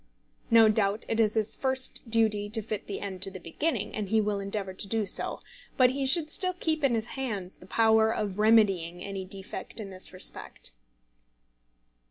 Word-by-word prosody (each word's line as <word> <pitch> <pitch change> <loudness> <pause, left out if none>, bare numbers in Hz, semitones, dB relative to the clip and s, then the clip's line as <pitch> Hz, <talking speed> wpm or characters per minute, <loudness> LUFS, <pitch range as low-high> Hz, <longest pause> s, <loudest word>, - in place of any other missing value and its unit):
No 230 -1 +7
doubt 210 -1 +1
it 225 - -1
is 215 -1 +3
his 220 0 +1
first 260 -2 0
duty 215 -2 +2
to 220 0 0
fit 215 -1 -5
the 200 - -4
end 190 -2 -5
to 195 - -2
the 190 -1 -9
beginning, 290 - -2
and 210 -3 -3
he 220 - +3
will 210 -1 0
endeavour 195 -1 -4
to 195 - -5
do 220 +1 0
so. 190 - -1 0.4
But 250 -1 +6
he 270 0 -1
should 310 +2 +4
still 365 -1 +2
keep 315 -2 -1
in 260 -4 +3
his 220 -1 -1
hands 210 -9 -4
the 180 - -15
power 220 +1 +4
of 205 -3 -3
remedying 195 -6 +3
any 195 -1 -5
defect 195 +3 -8
in 200 -3 -6
this 185 0 -5
respect. 185 - -3
215 Hz, 190 wpm, -28 LUFS, 195-230 Hz, 0.4 s, No